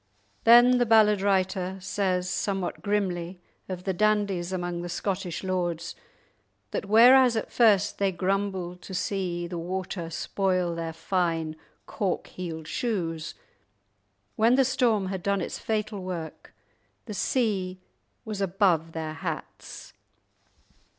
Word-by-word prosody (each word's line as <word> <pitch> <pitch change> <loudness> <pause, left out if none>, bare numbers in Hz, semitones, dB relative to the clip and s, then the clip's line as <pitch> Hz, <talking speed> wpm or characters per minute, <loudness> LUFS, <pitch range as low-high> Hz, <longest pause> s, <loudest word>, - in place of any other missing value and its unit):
Then 240 +2 +7
the 245 - +3
ballad 210 -3 +5
writer 190 -1 0
says 185 -1 -1
somewhat 190 -1 -2
grimly 185 -4 -2 0.3
of 180 -1 -5
the 190 - -1
dandies 200 -3 +1
among 175 -2 -3
the 175 - -5
Scottish 185 -1 -3
lords 175 -2 -2 0.8
that 195 - -3
whereas 245 +3 +7
at 220 - -3
first 210 -5 +3
they 200 -1 +2
grumbled 185 -1 -2
to 190 - -8
see 180 -3 -2
the 170 0 -5
water 180 -1 -4
spoil 180 +1 -1
their 165 -1 -4
fine 165 -2 -1 0.3
cork 195 -4 -2
heeled 160 -4 -7
shoes, 170 -10 -3 1.0
when 230 +3 +4
the 265 0 +4
storm 230 -7 +1
had 190 -2 -4
done 200 +2 0
its 175 - -4
fatal 215 -2 -2
work 170 -4 -6 0.5
the 220 - -6
sea 195 -5 -1 0.5
was 210 -2 -4
"above 175 -4 +1
their 160 -1 -4
hats"! 155 - -7
190 Hz, 125 wpm, -27 LUFS, 175-205 Hz, 1.0 s, Then